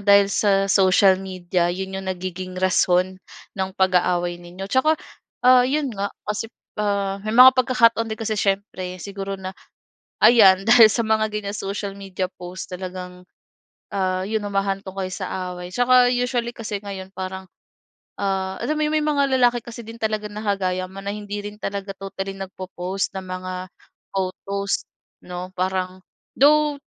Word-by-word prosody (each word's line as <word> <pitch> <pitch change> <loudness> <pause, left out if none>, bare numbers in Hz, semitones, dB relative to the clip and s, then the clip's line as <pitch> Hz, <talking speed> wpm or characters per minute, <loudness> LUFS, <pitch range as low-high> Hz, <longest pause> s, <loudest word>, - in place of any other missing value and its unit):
dahil 200 0 +5
sa 195 -1 +3
social 190 0 +5
media 180 -2 -1
yun 190 +2 -4
yung 190 - -6
nagiging 185 0 -5
rason 185 0 +2 0.3
ng 190 -1 -2
pag-aaway 180 -2 +1
ninyo. 175 +2 -8
'Tsaka 310 +5 +3 0.5
ah, 250 0 +7
yun 285 -2 0
nga, 200 -1 -2 0.2
kasi 210 +2 -3 0.3
ah, 200 -1 -1
may 215 +2 -3
mga 255 +1 +10
pagkakataon 240 -3 +3
din 220 - -4
kasi 220 -1 -1
siyempre 195 -2 -1
siguro 195 +1 -5
na, 190 0 -6 0.7
ayan 200 -5 +7
dahil 230 0 +8
sa 235 - +1
mga 220 0 +2
ganyang 210 -1 -3
social 200 0 -4
media 190 -2 -4
post 180 +1 -7
talagang, 180 0 -7 0.7
ah, 185 -1 0
yun 220 +1 -1
humahantong 195 -1 -2
kayo 185 -1 -3
sa 185 0 -4
away. 180 0 -8
'Tsaka 245 +2 +5
usually 245 -1 -1
kasi 215 -2 -4
ngayon 195 -2 -7
parang, 190 0 -5 0.7
ah, 190 -1 -1
alam 305 - 0
mo - - 0
yung 305 - -1
may 305 - -1
mga 285 -2 +2 0.2
lalaki 245 -1 +4
kasi 235 0 -8
din 225 - -9
talaga 215 -1 -1
na 210 +1 -7
kagaya 185 -3 0
mo 190 - -11
na 200 0 -4
hindi 205 -1 -5
rin 205 0 -7
talaga 200 0 -3
totally 195 0 -5
nagpo-post 190 0 -4
ng 190 - -4
mga 185 0 -5 0.6
photos, 195 +1 -2 0.4
'no. 180 +1 -7
Parang 185 0 -2 0.4
though 300 +1 +5
195 Hz, 155 wpm, -22 LUFS, 185-215 Hz, 0.7 s, mga